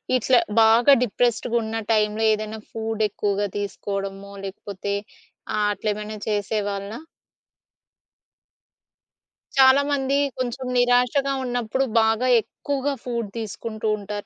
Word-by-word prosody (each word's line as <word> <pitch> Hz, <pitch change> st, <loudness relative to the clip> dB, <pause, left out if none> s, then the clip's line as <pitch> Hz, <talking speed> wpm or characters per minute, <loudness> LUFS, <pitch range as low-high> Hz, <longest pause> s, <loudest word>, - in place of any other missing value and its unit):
ఇట్లా 255 Hz, 0 st, +4 dB, 0.2 s
బాగా 230 Hz, +5 st, +6 dB
డిప్రెస్డ్‌గా 235 Hz, 0 st, 0 dB
ఉన్న 220 Hz, +1 st, -3 dB
టైంలో 215 Hz, 0 st, +2 dB
ఏదైనా 215 Hz, +1 st, -4 dB
ఫుడ్ 225 Hz, -1 st, -4 dB
ఎక్కువగా 205 Hz, 0 st, -1 dB
తీసుకోవడమో, 200 Hz, -1 st, -4 dB
లేకపోతే 200 Hz, +1 st, -5 dB, 0.6 s
ఆహ్, 210 Hz, 0 st, +2 dB
అట్లా 215 Hz, -, -3 dB
ఏమైనా 210 Hz, +1 st, -6 dB
చేసేవాళ్ళా? 205 Hz, 0 st, -2 dB, 2.6 s
చాలా 265 Hz, +1 st, +7 dB
మంది 275 Hz, -1 st, +1 dB, 0.2 s
కొంచెం 255 Hz, +1 st, -3 dB
నిరాశగా 245 Hz, +3 st, +3 dB
ఉన్నప్పుడు 245 Hz, +1 st, -1 dB, 0.2 s
బాగా 225 Hz, +3 st, +2 dB
ఎక్కువగా 280 Hz, +4 st, -3 dB
ఫుడ్ 235 Hz, -4 st, -3 dB
తీసుకుంటూ 220 Hz, 0 st, -5 dB
ఉంటారు. 205 Hz, 0 st, -6 dB
220 Hz, 100 wpm, -23 LUFS, 205-245 Hz, 2.6 s, చాలా